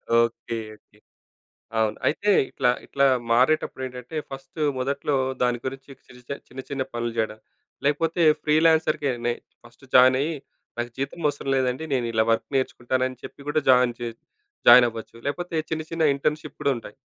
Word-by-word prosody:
Okay. 115 0 +1 0.2
Okay. 105 0 -27 0.8
అవును. 110 -1 +1
అయితే 205 +7 0 0.2
ఇట్లా 125 - +1 0.2
ఇట్లా 140 0 +1 0.3
మారేటప్పుడేంటంటే, 130 0 0
ఫస్ట్ 135 +3 -10 0.2
మొదట్లో 140 +2 -1 0.3
దాని 125 -1 +2
గురించి 135 +1 -6 0.2
చిరుచ 125 0 -18 0.2
చిన్న 130 +1 -8
చిన్న 135 -1 -1
పనులు 120 0 -2
జేయడం. 110 -1 -1 0.5
లేకపోతే 165 +3 +1 0.2
ఫ్రీ 150 - +2
లాన్సర్‌గానే 145 -7 +2 0.3
ఫస్ట్ 120 +3 -19
జాయినయ్యి, 130 +5 +5 0.4
నాకు 120 0 -3
జీతమవసరం 145 0 -2
లేదండి 130 +3 0
నేనిలా 115 -3 +1
వర్క్ 115 - 0
నేర్చుకుంటానని 130 0 -1
చెప్పి 140 +1 -11
కూడా 150 +1 +2
జాయిన్ 125 -2 +5
జే 120 -1 -3 0.6
జాయినవ్వచ్చు. 120 -2 +6
లేకపోతే 170 +4 -3
చిన్న 160 -1 -2
చిన్న 165 -1 0
ఇంటర్న్‌షిప్ 150 +1 -2
గూడా 140 - +2
ఉంటాయి. 115 - -11
130 Hz, 135 wpm, -24 LUFS, 120-145 Hz, 0.8 s, జాయినవ్వచ్చు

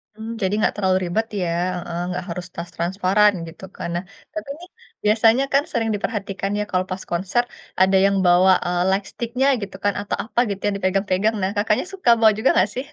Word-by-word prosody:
Hmm, 220 +1 -7
jadi 190 0 0
enggak 215 - +1
terlalu 190 -2 +2
ribet, 215 +6 0 0.2
ya, 180 - 0 0.3
heeh, 170 -1 -5
enggak 180 +1 -3
harus 175 +1 -5
tas 170 0 -6
transparan, 190 +4 +3 0.2
gitu 165 - -13
kan. - - -4
Nah, 175 - -2 0.3
tapi 315 -3 -6
nih 355 +1 -12 0.4
biasanya 225 +4 +4
kan 280 +1 +4
sering 225 -2 0
diperhatikan 200 -2 -3
ya, - - +1
kalau 185 0 +1
pas 185 +1 -4
konser 185 +7 +1 0.4
ada 190 +1 +5
yang 200 0 +3
bawa, 180 +2 +6
eee, 175 0 0
lightstick-nya 235 +6 -1
gitu 195 -1 -6
kan, 205 0 +2
atau 205 - -3
apa 235 - -2
gitu, 195 -1 -4
yang 205 -1 +1
dipegang-pegang. 195 +2 +1
Nah, 190 - +1
Kakaknya 210 +5 +1
suka 375 -10 0
bawa 220 -1 +6
juga 220 - +2
enggak, 185 +3 +3
sih? 255 +2 -3
200 Hz, 200 wpm, -22 LUFS, 185-220 Hz, 0.4 s, bawa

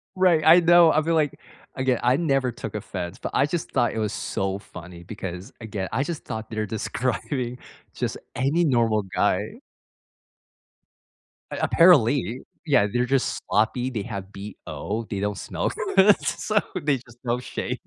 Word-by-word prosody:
Right, 180 -4 +4
I 165 +3 +9
know, 175 -1 +6
I 155 - +3
feel 165 +1 0
like 150 -1 0 0.4
again, 130 -2 +1
I 125 +3 +4
never 135 -6 +1
took 110 -3 -7
offense, 90 -4 -5
but - - -5
I 140 - +3
just 165 +2 -3
thought 120 - +1
it 110 - -3
was 105 -2 -1
so 95 -1 -2
funny 85 -2 -11
because, 95 -1 -7
again, 105 -4 -4
I 135 - +1
just 165 +1 -5
thought 110 0 -6
they're 110 -1 -2
describing 120 - -3 0.4
just - - -3 0.2
any 145 +7 +2
normal 115 -6 +2
guy. 105 - 0 1.9
A - - -4
apparently, 135 -7 +4 0.2
yeah, 135 -9 +4
they're 125 0 +1
just 135 0 0
sloppy, 120 +4 +1
they 110 -6 -3
have 95 -1 -6
BO, 105 +2 -6
they 100 - -3
don't 105 0 -2
smell - - -2 0.3
good, 195 +1 +6
so 210 -1 0 0.2
they 140 -2 +2
just, 120 0 -17
don't 120 +1 -1
shave. - - -4
120 Hz, 160 wpm, -24 LUFS, 105-150 Hz, 1.9 s, I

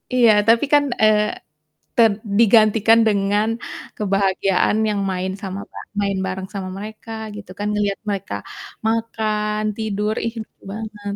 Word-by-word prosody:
iya 235 -3 +6 0.2
tapi 230 +5 +5
kan, 290 0 +6 0.2
eee, 215 -1 +5 0.7
ter 225 -2 +6 0.3
digantikan 225 0 +5
dengan 205 +1 +2 0.5
kebahagiaan 195 0 +1
yang 205 -1 -1
main 185 0 -2
sama 195 -1 -5
apa, - - -10 0.2
main 200 -1 0
bareng 190 0 -4
sama 190 -2 -4
mereka 215 +2 -8 0.2
gitu 210 -3 -10
kan, 205 - -1
ngelihat 205 -1 0
mereka 190 - -3 0.5
makan, 215 -2 -1 0.2
tidur, 215 -1 -1
ih 230 - -1
lucu 220 - -11
banget. 215 0 -7
210 Hz, 135 wpm, -21 LUFS, 195-220 Hz, 0.7 s, iya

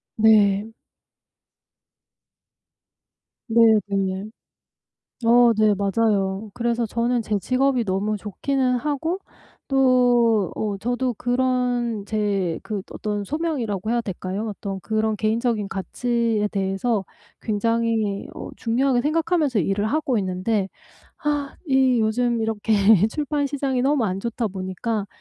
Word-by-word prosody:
네. 215 -2 +4 2.8
네 230 +1 +4 0.3
네. 195 -1 -1 1.0
어 240 0 +6
네 215 -1 +4
맞아요. 200 0 0
그래서 235 -1 0
저는 235 +2 0
제 210 -1 -1
직업이 255 +2 +1
너무 200 +2 -1
좋기는 250 +6 -1
하고 305 +7 -2 0.5
또 245 -6 +3
어 205 -2 -2
저도 245 +3 -1
그런 245 -2 0
제 200 -6 -1
그 205 -4 -4
어떤 210 -1 -3
소명이라고 235 - -2
해야 240 - +2
될까요? 195 +1 -4
어떤 195 -1 -5
그런 220 +2 0
개인적인 220 -1 0
가치에 230 +1 -1
대해서 195 +2 -1 0.4
굉장히 225 -1 0
어 - - -7
중요하게 245 +2 +1
생각하면서 310 - +1
일을 195 +5 0
하고 275 -2 0
있는데 190 +2 -1 0.6
아 290 -2 -1
이 265 -3 +3
요즘 235 +2 +1
이렇게 220 0 -1 0.4
출판 290 +1 -1
시장이 270 -2 -1
너무 275 -2 +2
안 190 -2 -1
좋다 230 +1 -2
보니까 195 +3 -3
225 Hz, 235 characters per minute, -23 LUFS, 205-250 Hz, 2.8 s, 어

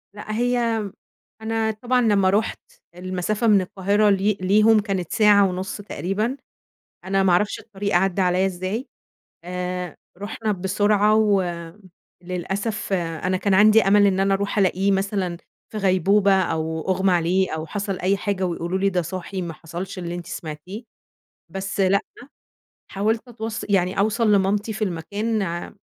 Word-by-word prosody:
لأ 210 +1 -7
هي 245 +1 +1 0.9
أنا 220 0 0
طبعًا 245 +4 0
لمّا 200 -5 +3
رُحت 215 +3 0 0.3
المسافة 185 +5 -2
من 205 -3 +5
القاهرة 200 +3 +1
لي 200 +1 +2
ليهم 210 +3 +4
كانت 195 -5 -3
ساعة 205 -2 +5
ونص 185 +1 -4
تقريبًا، 210 +6 -2 0.7
أنا 195 0 +1
ما 185 - +3
أعرفش 205 +4 +1
الطريق 200 -3 -4
عدّى 190 +1 +2
عليَّ 185 +1 +2
إزاي. 190 +7 -3 0.6
آآ 180 -1 -4 0.2
رُحنا 215 +2 -3
بسرعة 205 +2 +2
و 205 -3 +3 0.8
للأسف 195 +4 -3
أنا 175 +1 -1
كان 200 0 0
عندي 215 +3 +6
أمل 205 +1 +4
إن 190 -1 +1
أنا 195 0 +2
أروح 200 +2 -2
ألاقيه 195 0 +2
مثلًا 195 -3 -1 0.3
في 215 - -5
غيبوبة 195 +1 +3
أو 160 -1 -2
أُغمى 190 0 +2
عليه 180 +2 +1
أو 160 0 -4
حصل 195 +1 -4
أي 195 +2 +1
حاجة 195 -2 -2
ويقولوا 175 +2 -2
لي 195 0 +2
ده 180 -2 0
صاحي 185 +3 -5
ما 170 -2 -5
حصلش 175 +4 -7
اللي 175 0 -4
أنتِ 175 - -7
سمعتيه، 170 +8 -7 0.7
بس 195 +1 -3
لأ، 195 +1 +3 0.9
حاولت 220 +5 -1
أتوص 225 -1 -5
يعني 190 -1 +1
أوصَل 215 +1 +2
لمامتي 205 +2 +1
في 215 +1 -2
المكان 205 +5 -2
ع 170 -2 -4
195 Hz, 150 wpm, -22 LUFS, 180-210 Hz, 0.9 s, عندي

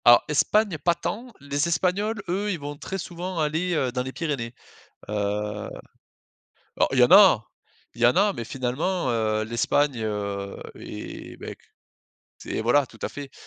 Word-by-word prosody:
Alors 120 0 +8
Espagne, 190 +4 +2
pas 170 -1 +4
tant! 240 +8 -4
Les 145 +3 0
Espagnols, 195 +5 0
eux, 200 +4 -1
ils 175 - -3
vont 145 0 -5
très 190 +6 -5
souvent 180 0 -5
aller, 160 +3 0
heu, 130 -5 +1
dans 125 0 -1
les 130 +1 -4
Pyrénées. 130 -7 -3 0.5
Heu, - - -4 1.7
alors - - +3
il 130 - +1
y - - +7
en 125 - +5
a. 190 - +8 0.5
Il 120 - -7
y - - +8
en 120 - +4
a 200 +2 +4
mais 115 - -4
finalement, 135 +8 -1
heu, 110 -2 +1
l'Espagne, 115 +3 +1
heu 100 -2 -3 0.2
et - - -8
beh - - -7
qu - - -28 0.8
c'est - - -3
voilà, 125 +5 +4
tout 115 -2 -17
à - - -2
fait. 140 -1 -8
145 Hz, 175 wpm, -25 LUFS, 120-180 Hz, 1.7 s, Alors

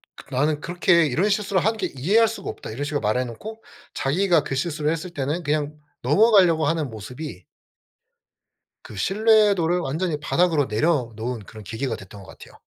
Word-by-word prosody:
"그 135 - -14
나는 145 +3 +1
그렇게 175 +1 +2
이런 160 +9 +1
실수를 200 -3 +1
하는 220 +1 +1
게 - - -3
이해할 205 - +3
수가 225 - -6
없다." - - -7
이런 125 +6 -4
식으로 145 0 -2
말해 110 +5 +1
놓고 220 - -9 0.3
자기가 170 +3 +2
그 135 - -4
실수를 150 +1 -1
했을 165 +2 -4
때는 150 +3 -3
그냥 150 0 -1 0.3
넘어가려고 180 - +4
하는 155 -3 0
모습이 110 - -8 1.4
그 105 - -11
신뢰도를 200 - +3
완전히 160 +1 -2
바닥으로 160 -1 +2
내려놓은 120 -3 -1
그런 110 +1 -11
계기가 115 +4 -3
됐던 100 0 -12
것 - - -15
같아요. - - -14
155 Hz, 380 characters per minute, -23 LUFS, 130-180 Hz, 1.4 s, 넘어가려고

